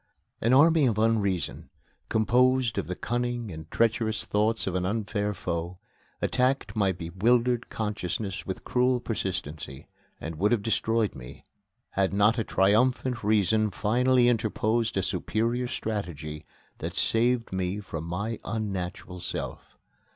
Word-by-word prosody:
An 115 - +2
Army 150 +2 +6
of 110 -4 0
Unreason, 105 -5 0 0.4
composed 120 +1 +3
of - - -4
the 90 - -3
cunning 120 -1 -2
and 80 -1 -9
treacherous 115 0 +1
thoughts 110 +2 +1
of 95 - -2
an 90 0 0
unfair 105 +1 -1
foe, 85 -2 -4 0.5
attacked 125 -4 +1
my 100 -3 +2
bewildered 115 +8 +1
consciousness 105 -2 -3
with 95 - -5
cruel 125 0 +2
persistency, 90 - -4 0.3
and 80 0 -6
would 100 +5 +2
have 110 -4 0
destroyed 115 -1 +1
me, 60 -2 -11 0.5
had 95 0 +1
not 105 +4 +3
a - - +1
triumphant 115 +5 +2
Reason 110 +1 +3
finally 120 +5 +3
interposed 115 -1 +1
a 95 - +1
superior 115 +7 -1
strategy 80 -10 -4 0.3
that - - -5
saved 115 -1 +2
me 95 +2 -1
from 80 -6 -6
my 100 +7 -3
unnatural 95 -4 -4
self. - - -6
110 Hz, 130 wpm, -27 LUFS, 95-120 Hz, 0.5 s, Army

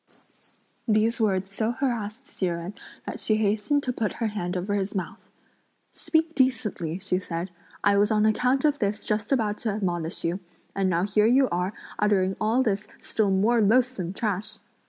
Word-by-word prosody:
These 225 +2 +2
words 195 -2 +1
so 220 +3 -1
harassed 235 -1 -2
Hsi 190 - -3
Jen 170 +2 -3 0.3
that - - -5
she 215 - +2
hastened 220 +7 +1
to 250 - -1
put 220 -4 -1
her 230 - -3
hand 190 -4 -2
over 190 +3 -2
his 200 0 -1
mouth. 185 -3 -5 0.6
"Speak 320 0 0
decently," 225 - 0
she 185 -1 -1
said; 175 0 -4 0.3
"I 200 0 +4
was 205 +1 +3
on 215 -1 +3
account 250 +6 +2
of 295 -1 +2
this 210 +1 -1
just 210 +2 -2
about 215 -6 +1
to 225 - -1
admonish 175 -5 -2
you, 170 +3 -1 0.4
and 195 -1 +1
now 170 0 +1
here 210 +2 +3
you 260 +3 +5
are 180 +3 -1 0.3
uttering 195 -2 +2
all 225 +5 +3
this 205 -3 -1
still 215 -2 0
more 215 +5 +3
loathsome 220 -4 +2
trash." 205 0 -3
210 Hz, 175 wpm, -26 LUFS, 190-230 Hz, 0.6 s, you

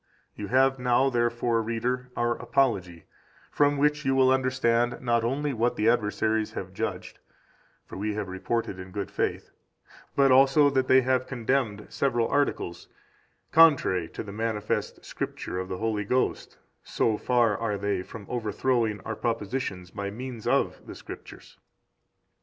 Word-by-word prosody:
9 105 - -5
You - - -7
have 135 +3 +3
now, 125 +2 +2
therefore, 120 -1 +1
reader, 125 +3 -2
our 120 0 +1
Apology, 100 -9 0 0.5
from 145 0 +2
which 150 +1 +2
you 135 -1 +1
will 130 -1 +5
understand 125 -2 +1
not 120 -2 +1
only 140 +4 -1
what 120 +1 0
the 105 - 0
adversaries 110 -1 +1
have - - -6
judged - - -4 0.7
(for - - -9
we 105 +1 -2
have 105 -3 -3
reported 95 +1 -3
in 95 0 -8
good 100 +1 -5
faith), - - -2 0.6
but 135 -1 +4
also 135 +2 +5
that 130 -1 +1
they 130 0 +6
have 130 0 0
condemned 120 -4 -1
several 120 -4 +1
articles 140 -11 -1 0.6
contrary 140 - +5
to - - -6
the 100 - -8
manifest 105 0 -3
Scripture 90 - -5
of 95 - -4
the 95 - -3
Holy 110 0 -1
Ghost 125 +5 -1 0.3
so 110 - 0
far 120 -1 +2
are 105 -1 -2
they 100 -1 -1
from 100 +2 -10
overthrowing 115 -1 -1
our 110 - -5
propositions 105 -4 -3
by 100 -1 -4
means 120 +1 -7
of - - +1
the - - -8
Scriptures. - - -11
115 Hz, 155 wpm, -27 LUFS, 105-130 Hz, 0.7 s, they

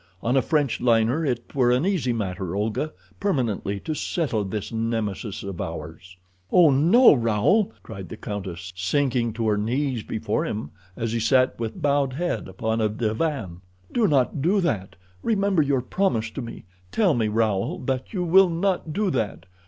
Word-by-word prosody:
On 120 +3 +1
a 135 - +5
French 145 -2 0
liner 120 +5 +3
it 120 -5 -2
were 125 -3 +3
an 125 +6 +2
easy 180 -11 +1
matter, 95 -5 -3
Olga, 110 +9 -1 0.3
permanently 115 - -1
to 155 - -3
settle 140 - -1
this 100 +1 -4
Nemesis 110 -3 -2
of 100 -3 -5
ours." 90 +1 -7 0.3
"Oh, 170 -5 +6
no, 170 - +6
Raoul!" 115 - +2
cried 95 -2 -8
the 110 - -7
countess, 95 -4 -6
sinking 120 +5 0
to 115 0 -2
her 105 -1 +2
knees 125 +3 -1
before 110 0 -2
him 105 -9 -4 0.3
as 115 -1 -2
he 115 - 0
sat 130 +3 +2
with 115 -1 -5
bowed 140 -2 +2
head 175 +6 -2
upon 110 +4 -2
a 110 - +2
divan. 110 - -2 0.3
"Do 230 -3 +3
not 140 -2 +1
do 185 +7 +3
that. 105 - -2 0.3
Remember 200 -5 +2
your 140 -3 +1
promise 120 - 0
to 135 - -5
me. 115 -1 -8 0.3
Tell 200 -7 +3
me, 115 -4 +1
Raoul, 110 - 0
that 130 -1 -2
you 185 -4 -1
will 185 +2 +6
not 170 -2 -1
do 205 +1 0
that. 105 - -2
120 Hz, 170 wpm, -24 LUFS, 105-155 Hz, 0.3 s, Oh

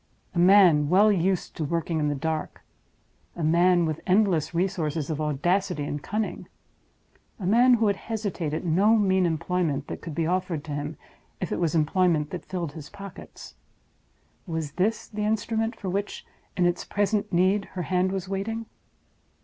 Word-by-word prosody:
A 175 - -1
man 175 -5 +6
well 205 +5 +5
used 185 -1 0
to 160 - -2
working 165 +1 -1
in 150 - +1
the 145 - 0
dark; 160 +2 -4 0.7
a 170 - -4
man 175 +2 +4
with 155 -1 -3
endless 185 -6 +2
resources 165 -4 -1
of 155 0 -3
audacity 165 +3 0
and 145 0 -4
cunning; 215 +6 -3 0.9
a 190 - -5
man 240 +6 +5
who 225 -1 +1
would 200 -2 +2
hesitate 205 -9 -3
at 155 - -3
no 190 +6 +4
mean 190 -3 +3
employment 165 -3 -1
that - - -6
could 160 - -7
be 165 - 0
offered 180 -3 -1
to 160 - -8
him, 145 +1 -4 0.4
if - - -4
it - - -1
was 170 -2 0
employment 160 -1 +2
that 180 - -6
filled 175 -5 -4
his 150 -1 -10
pockets—was 165 -4 -10
this 200 +8 -1
the 210 -1 -4
instrument 225 +2 -1
for 200 - -7
which, 200 +2 -3 0.3
in 180 - +3
its 175 0 0
present 205 0 -1
need, 190 +3 +2
her 180 - -2
hand 185 +2 +1
was 190 -1 -3
waiting? 215 +4 -3
180 Hz, 165 wpm, -26 LUFS, 160-200 Hz, 0.9 s, man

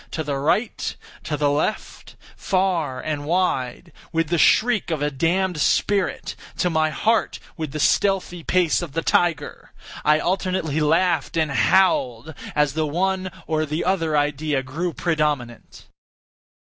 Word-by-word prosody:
To 160 - -3
the 140 -2 -2
right—to 160 - -2
the 145 -1 +2
left—far 165 -2 -2
and 150 -2 -3
wide—with 165 0 -2
the 170 -1 +1
shriek 235 +1 +3
of 160 -3 -1
a 150 - 0
damned 170 +4 0
spirit! 200 +3 0 0.2
to 180 - +1
my 160 -1 +2
heart 220 +9 0 0.2
with 155 -4 -5
the 155 - -5
stealthy 185 +1 +1
pace 180 -2 +2
of 165 -6 -7
the 165 +1 -2
tiger! 165 -4 0 0.3
I 150 0 +4
alternately 180 -3 -1
laughed 165 +1 +1
and 155 -3 +1
howled 130 -1 +2 0.2
as 150 -2 +2
the 155 0 -1
one 185 +4 -1 0.2
or 155 -1 0
the 155 +2 -3
other 165 -5 +1
idea 145 -1 0
grew 160 +7 -3
predominant. 150 -9 -2
160 Hz, 135 wpm, -22 LUFS, 150-180 Hz, 0.3 s, I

